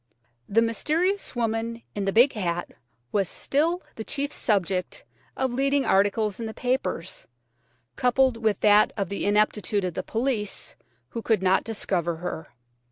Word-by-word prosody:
The 225 +3 +4
mysterious 325 - 0
woman 230 0 -2
in 200 -1 -2
the 195 - +1
big 245 +7 +5
hat 175 -5 -2 0.4
was 195 -3 +1
still 330 +6 0
the 220 - -4
chief 285 +4 -2
subject 190 - -1 0.3
of 260 -2 0
leading 275 +2 +2
articles 205 +1 +2
in 230 - -3
the 220 - -7
papers, 250 -9 -2 0.7
coupled 255 0 +3
with 220 -3 0
that 210 0 +6
of 195 -4 -1
the 200 - -3
ineptitude 210 -1 +2
of 180 - -2
the 185 - -2
police 225 -1 -2 0.3
who 230 - -5
could 220 -4 +1
not 190 0 +3
discover 180 -6 -1
her. 160 -1 -5
220 Hz, 150 wpm, -26 LUFS, 195-250 Hz, 0.7 s, that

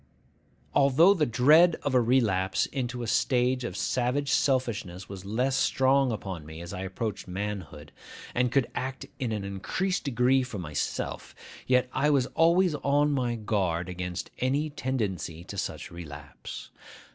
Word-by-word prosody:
Although 145 +7 +6
the 160 -6 +1
dread 155 +9 +6
of 145 - -1
a 125 - +5
relapse 110 -6 +2
into 125 -2 -4
a - - -4
stage 125 +2 +2
of 120 - -4
savage 130 +3 0
selfishness 115 -9 0
was 95 -1 -9
less 125 +6 0
strong 135 0 +3
upon 95 -7 -5
me 80 +1 -9
as 85 +2 -7
I 90 - -5
approached 95 +1 -4
manhood, 90 -6 -5 0.4
and 125 0 +1
could 135 -2 +3
act 130 +1 -4
in 125 -4 -1
an 105 -2 -2
increased 140 - -2
degree 130 0 +3
for 125 -4 -5
myself, 80 -5 -4 0.3
yet 125 0 +3
I 150 - +2
was 140 -4 +3
always 170 +1 +4
on 145 0 +2
my 125 -4 0
guard 95 -6 -1
against 90 0 -5
any 140 +4 0
tendency 105 - -3
to 100 - -9
such 100 - -4
relapse. 75 -4 -9
120 Hz, 150 wpm, -28 LUFS, 95-135 Hz, 0.4 s, Although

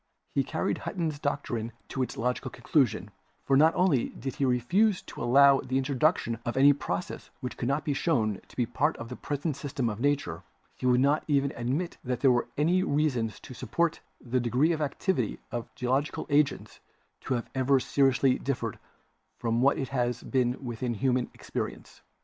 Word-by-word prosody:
He - - +2
carried - - -2
Hutton's 160 -6 -3
doctrine 120 -6 -2 0.2
to 130 - -3
its 130 - -3
logical 125 +2 -1
conclusion, 130 +2 0 0.3
for 135 - +3
not 155 +4 +5
only 175 -9 +2
did 135 +1 -6
he 140 - +1
refuse 175 - +2
to - - -9
allow 135 +3 +6
the 130 +1 -2
introduction 135 -3 +1
of 120 +2 -3
any 140 +2 +7
process 145 +5 -4
which 125 -2 -5
could 120 - -3
not 140 +3 0
be 145 - +1
shown 115 - 0
to - - -18
be 125 - +1
a - - -3
part 150 +6 0
of 115 0 -7
the 125 - -5
present 145 +2 -3
system 140 -4 -2
of 105 - -7
Nature, 135 - 0 0.3
he 125 - -2
would 125 0 +4
not 145 +3 +3
even 140 -2 +1
admit 135 +9 -2
that 125 -1 -2
there 135 - +6
was 120 -1 +1
any 170 +5 +3
reason 145 -9 +1
to 110 +4 -12
suppose 145 +8 -1 0.2
the 125 +1 -1
degree 125 +7 +2
of 160 -2 -1
activity 145 - -1
of 120 0 -3
the - - -34
geological 130 +4 -1
agents 145 0 +1 0.4
to 130 - -2
have 120 - -3
ever 130 +1 +3
seriously 135 -1 +2
differed 120 -5 -3 0.6
from 115 -1 0
what 140 +2 +4
it 135 - -3
has 120 -2 -1
been 125 0 0
within 120 0 -3
human 125 +2 +1
experience. - - -6
130 Hz, 185 wpm, -28 LUFS, 120-145 Hz, 0.6 s, any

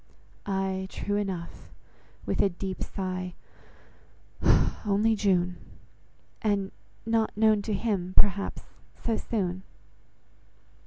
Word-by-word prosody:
"Ay, 190 -1 0
true 205 - -2
enough," 190 -5 -3 0.6
(with - - +1
a 200 - +4
deep 190 +1 -5
sigh) 185 -2 -3 1.5
"only 215 +1 +3
June." 180 -4 +2 0.8
"And 200 -3 +1 0.3
not 225 -2 +1
known 215 -1 +5
to 215 +1 -2
him, 190 -4 -1
perhaps, 200 -1 +3 0.4
so 230 - +1
soon." 185 -5 -1
195 Hz, 95 wpm, -28 LUFS, 185-210 Hz, 1.5 s, known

